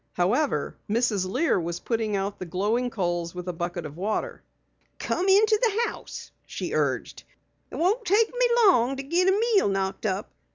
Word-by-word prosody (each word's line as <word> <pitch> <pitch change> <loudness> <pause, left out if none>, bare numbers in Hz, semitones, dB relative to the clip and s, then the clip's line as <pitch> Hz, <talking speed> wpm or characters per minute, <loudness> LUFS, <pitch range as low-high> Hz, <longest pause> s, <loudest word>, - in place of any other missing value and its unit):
However, 235 +12 0
Mrs. 210 -4 +1
Lear 260 - +1
was 170 0 -4
putting 225 -3 -1
out 195 +1 -3
the 185 - -5
glowing 210 +8 0
coals 175 -5 -2
with 180 0 -6
a 180 - -2
bucket 175 0 -4
of 150 -1 -8
water. 215 - -3 0.6
"Come 375 +2 -1
into 425 +2 +5
the 470 0 +1
house," - - -10 0.2
she - - -5
urged. - - -1 0.5
"It - - -9
won't 405 +8 +1
take 430 +3 +3
me - - +1 0.2
long 270 - +4
to 270 - -5
git 345 +6 +1
a 395 - +1
meal 450 - +3
knocked 195 +2 -2
up. 195 +2 -3
230 Hz, 175 wpm, -26 LUFS, -, 0.6 s, into